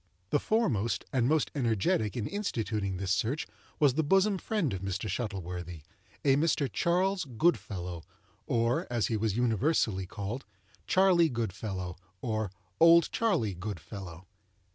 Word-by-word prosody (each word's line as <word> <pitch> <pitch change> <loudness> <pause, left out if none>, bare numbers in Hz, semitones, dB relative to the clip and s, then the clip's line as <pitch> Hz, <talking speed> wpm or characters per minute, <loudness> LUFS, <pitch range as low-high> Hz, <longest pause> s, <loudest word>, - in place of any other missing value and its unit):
The 145 - +3
foremost 130 - 0
and 125 -2 +2
most 155 +1 +2
energetic 110 -3 +1
in 110 - -2
instituting 110 - -2
this 95 0 -2
search 125 - 0 0.3
was 145 -4 +5
the 160 - +2
bosom 195 +5 +3
friend 185 - -1
of 95 - -4
Mr. 95 +2 -3
Shuttleworthy—a 90 - -3
Mr. 150 -2 +2
Charles 185 +2 +1
Goodfellow, 100 - -1 0.5
or, 115 +1 +1
as 120 -3 +1
he 115 - 0
was 110 -1 0
universally 115 - +1
called, 100 +7 -5 0.4
"Charley 185 -3 +5
Goodfellow," 95 - -4 0.2
or 110 -2 -2 0.3
"Old 165 0 +7
Charley 120 - +1
Goodfellow." 95 -2 -7
115 Hz, 125 wpm, -30 LUFS, 95-155 Hz, 0.5 s, Old